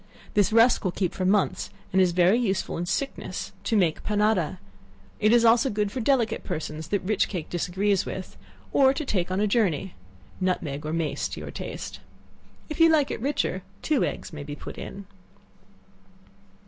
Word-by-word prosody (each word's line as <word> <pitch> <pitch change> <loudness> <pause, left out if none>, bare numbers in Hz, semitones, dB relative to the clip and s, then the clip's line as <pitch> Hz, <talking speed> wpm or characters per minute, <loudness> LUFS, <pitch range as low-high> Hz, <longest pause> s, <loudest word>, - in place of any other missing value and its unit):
This 205 +1 +3
rusk 230 +2 +5
will 185 - 0
keep 180 -1 -1
for 185 - -2
months, 195 +1 +1 0.2
and 190 - +5
is 180 -1 +4
very 180 +6 +4
useful 195 -6 -1
in 175 +1 -3
sickness, 270 +10 -3
to 225 - +2
make 170 -6 +1
panada; 210 -5 +1 0.6
it 215 0 +4
is 235 0 +5
also 235 +3 +5
good 210 -2 -1
for 260 - -4
delicate 235 -2 +1
persons 155 -2 -5
that 200 +2 -1
rich 210 +2 +1
cake 180 -6 -5
disagrees 190 +3 +1
with, 185 - -6 0.4
or 270 -1 +5
to 305 - -3
take 180 -8 -1
on 185 +1 -1
a 210 - +3
journey. 195 -5 +1 0.5
Nutmeg 155 -6 -1
or - - -2
mace 155 -3 -1
to - - -7
your - - -7
taste. - - -6 0.7
If 305 - -6
you 330 0 +7
like 300 -3 +3
it - - -4
richer, 265 -8 -1 0.2
two 300 -5 +2
eggs - - -4
may 150 - -6
be 145 0 -6
put - - -9
in. 200 0 -8
200 Hz, 180 wpm, -26 LUFS, 175-230 Hz, 0.7 s, you